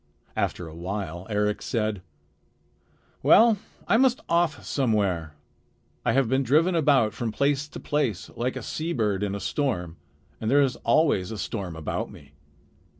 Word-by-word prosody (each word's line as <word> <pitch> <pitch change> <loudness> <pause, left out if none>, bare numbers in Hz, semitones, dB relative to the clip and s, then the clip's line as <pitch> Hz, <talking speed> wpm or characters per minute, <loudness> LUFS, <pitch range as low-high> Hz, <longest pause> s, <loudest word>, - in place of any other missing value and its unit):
After 90 - -2
a 80 - -10
while 90 0 -5
Eric 105 0 0
said: 110 -4 -1 1.2
"Well, 225 -2 +6 0.3
I - - +4
must 260 +1 +3
off 170 -2 +1
somewhere. 100 - 0 0.7
I - - +2
have 135 -2 +3
been 130 +3 +2
driven 155 +8 +3
about 140 -9 +3
from 115 -3 -3
place 140 +3 +1
to - - -9
place, 135 -10 -1
like 125 +2 -2
a - - -5
seabird 115 - -1
in 100 -1 -1
a - - -4
storm. 90 - -2 0.4
And 110 - -2
there 140 +3 +5
is 130 -3 0
always 115 - +2
a 110 - -5
storm 95 -5 -4
about 80 -1 -3
me. - - -15
115 Hz, 150 wpm, -26 LUFS, 100-145 Hz, 1.2 s, Well